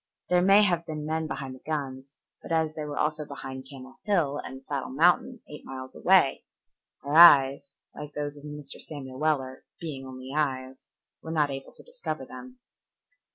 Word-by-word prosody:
There 180 0 +4
may 195 +3 +6
have 175 -4 +1
been 155 -1 -5
men 160 +1 -1
behind 135 -4 -5
the 130 - -12
guns, 135 -3 -5 0.2
but - - -10
as 160 -1 +1
they 155 -1 -5
were 145 -1 -6
also 150 0 0
behind 135 -2 -8
Camel 130 -2 -12
Hill 165 -9 +1
and 130 0 -8
Saddle 140 -3 -3
Mountain, 175 - +2
eight 150 - -10
miles 130 -1 -8
away, 185 -7 +4 0.6
our 145 - -4
eyes, 140 -4 +7 0.2
like 150 0 -8
those 145 0 -3
of 145 - -14
Mr. 150 -2 -8
Samuel 135 -4 -8
Weller, 135 -4 -1 0.2
"being 140 -5 -6
only 130 0 -9
eyes," 130 -3 -2 0.3
were 160 - -9
not 150 -3 +1
able 135 0 -7
to - - -13
discover - - -6
them. 255 0 -11
145 Hz, 175 wpm, -27 LUFS, 135-160 Hz, 0.6 s, eyes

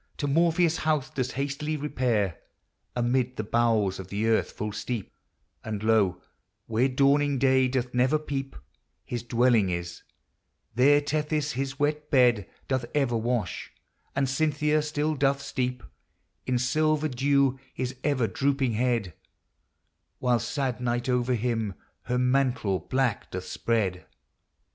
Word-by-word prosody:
115 - - -32
To 145 -1 -1
Morpheus, 165 0 +3
house 155 -4 0
doth 130 -2 -2
hastily 145 +3 -2
repaire, 125 - 0 0.6
Amid 125 +1 +1
the 110 - -1
bowels 110 -4 +1
of 95 - -7
the 100 +3 -2
earth 115 -1 +2
full 105 0 -4
steepe, 110 0 -4 0.5
And 105 -1 -4
low, 105 -5 +3 0.5
where 115 +4 +2
dawning 140 +1 +3
day 130 0 +4
doth 125 -1 -2
never 130 +5 +3
peepe, 135 -3 -4 0.5
His 120 -1 -4
dwelling 120 -3 +3
is; 85 0 -4 0.7
there 145 +5 +5
Tethys 150 0 -1
his 135 +1 -3
wet 150 +1 -1
bed 120 -7 +3 0.2
Doth 130 -2 0
ever 135 -5 +2
wash, 115 -5 -2 0.4
and 135 0 +1
Cynthia 150 +2 +1
still 150 0 -1
doth 140 -1 +1
steepe 125 -3 -3 0.6
In 125 -1 +2
silver 155 +5 +1
deaw 135 0 +2
his 130 0 -4
ever 140 -5 +2
drouping 135 +1 0
hed, 115 -6 0 1.0
Whiles 120 -2 +1
sad 130 -3 -2
Night 120 +1 -1
over 125 0 +1
him 115 -4 -1 0.3
her 125 +1 0
mantle 125 -6 +1
black 130 -4 -1
doth 95 0 -5
spred. 100 -6 -1
130 Hz, 135 wpm, -27 LUFS, 115-140 Hz, 1.0 s, there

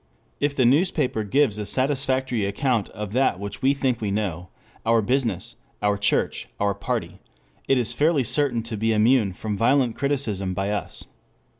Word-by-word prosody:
If 145 0 0
the 130 - +3
newspaper 140 - +2
gives 110 0 +1
a 105 - -3
satisfactory 130 -3 0
account 110 +2 0
of 105 -1 -7
that 125 -8 +2
which 100 0 -6
we 135 +2 +3
think 130 -4 -1
we 105 - -1
know, 95 -4 -2 0.3
our 115 0 +3
business, 115 -2 -1 0.2
our 105 0 +1
church, 100 0 0
our 100 0 +1
party, 100 - -4 0.5
it 135 - +3
is 120 -1 -1
fairly 150 +1 +2
certain 125 -2 0
to 115 -1 -5
be 110 +2 +1
immune 110 -1 +3
from 105 +3 -4
violent 120 +2 +2
criticism 110 -10 -1
by 95 +2 -1
us. 105 - -4
115 Hz, 165 wpm, -24 LUFS, 105-135 Hz, 0.5 s, the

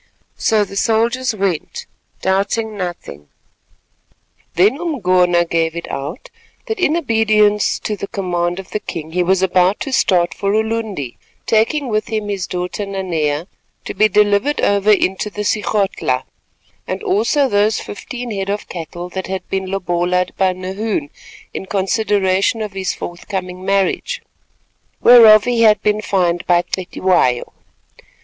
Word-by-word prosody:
So 215 -2 +2
the 195 - -11
soldiers 230 +3 +1
went, 190 -6 -2 0.4
doubting 200 +3 0
nothing. 175 - -6 1.3
Then 210 - +3
Umgona 185 - +2
gave 165 -1 0
it 170 - -5
out 140 +5 -6 0.3
that 445 -3 -4
in 325 -2 +2
obedience 215 -7 +2
to 210 - -2
the 200 - -6
command 175 -4 -2
of 190 -1 -9
the 210 - -1
king 160 -5 -7
he 180 +2 0
was 185 +1 +2
about 185 +1 +3
to 275 - -3
start 180 -8 +2
for 200 0 -1
Ulundi, 220 - -2 0.3
taking 230 +6 +1
with 215 -2 -1
him 215 -2 -3
his 195 -3 -3
daughter 180 +3 -3
Nanea 170 -6 -2 0.4
to - - -4
be 215 - +4
delivered 210 +8 +2
over 200 +1 +2
into 195 0 +1
the 210 0 -5
Sigodhla, 200 -11 0 0.6
and - - -4
also 375 -8 +2
those 210 -1 +2
fifteen 245 +3 -7
head 195 -1 -3
of 205 +1 -3
cattle 175 +1 -6
that 190 +1 -5
had 190 -1 -5
been 190 -1 -2
lobola'd 180 -1 0
by 190 -1 +2
Nahoon 185 -3 -3 0.4
in 190 - -6
consideration 200 +1 +1
of 210 -2 -6
his 190 -3 -2
forthcoming 180 +1 -6
marriage, 195 - 0 0.8
whereof 220 -3 +8
he 240 -1 0
had 215 -2 +5
been 210 0 +1
fined 180 -4 0
by 175 0 +4
Cetywayo. 180 -9 0
195 Hz, 140 wpm, -18 LUFS, 180-215 Hz, 1.3 s, whereof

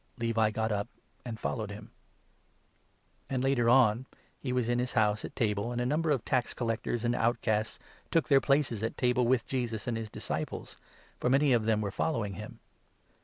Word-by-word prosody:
" - - -39
Levi 115 -2 +2
got 110 +1 -1
up 105 0 -1 0.4
and 115 -3 -6
followed 110 -5 -2
him. 105 +1 -9 1.4
And 130 -1 -1
later 130 -3 +3
on 125 -1 +4 0.3
he 130 - -3
was 125 -2 +1
in 120 0 +1
his 125 0 -1
house 105 -2 +2
at - - -7
table, 105 -2 0
and 120 - -2
a 125 - 0
number 155 +5 +1
of 140 -5 +2
15 - - -39
tax 125 -2 +1
gatherers 115 0 -2
and 120 - +2
outcasts 110 -3 0 0.3
took 165 - +2
their 135 -2 +5
places 140 -6 +1
at 115 - -3
table 125 -1 +2
with 125 -1 +2
Jesus 120 -5 -2
and 120 - -1
his 110 -1 -4
disciples; - - -5 0.4
for 125 - +1
many 135 +1 +4
of 115 -3 +2
them 110 -1 +2
were 100 -2 -2
following 105 -3 -1
him. - - -8
120 Hz, 195 wpm, -30 LUFS, 110-125 Hz, 1.4 s, their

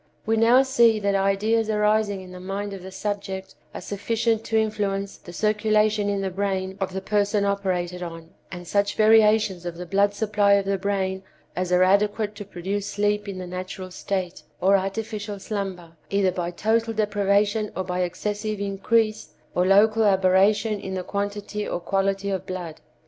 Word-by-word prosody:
We 225 - +2
now 235 +4 +5
see 235 -4 +4
that 200 -1 0
ideas 205 +3 +1
arising 210 -2 +1
in 185 -1 -11
the 180 - -9
mind 195 +2 -4
of 195 - -7
the 190 - -8
subject 195 -1 -4 0.2
are - - -7
sufficient 225 +2 -1
to 225 - 0
influence 200 -2 -1
the 175 - -12
circulation 215 +1 +1
in 200 -1 -1
the 190 -1 -2
brain 190 0 -2
of 190 - -1
the 190 +1 -4
person 205 +1 +1
operated 180 -3 -1
on, 165 -1 -8 0.2
and 175 -1 -8
such 200 +2 +1
variations 215 -4 +4
of 175 -1 -5
the 180 - -6
blood 200 +2 +2
supply 205 -1 +2
of 200 -1 +3
the 195 -1 0
brain 190 -1 -1 0.3
as 180 0 -2
are 180 0 +5
adequate 205 +2 +2
to 205 - -7
produce 195 +2 -4
sleep 210 0 0
in 195 - -5
the 185 - -5
natural 185 +1 -6
state, 185 -1 -3 0.2
or 195 +2 +4
artificial 205 +1 -3
slumber, 190 -4 -5 0.2
either 200 -2 +2
by 175 -1 -3
total 225 +5 0
deprivation 205 0 +1
or 190 - -2
by 180 0 -3
excessive 205 +4 -3
increase 215 +2 0 0.2
or 180 +1 +2
local 215 +3 +5
aberration 200 +2 +3
in 190 -1 -5
the 185 - -3
quantity 205 +1 -3
or - - -2
quality 195 +2 -1
of 190 - -3
blood. 175 -4 -6
200 Hz, 175 wpm, -24 LUFS, 190-210 Hz, 0.3 s, now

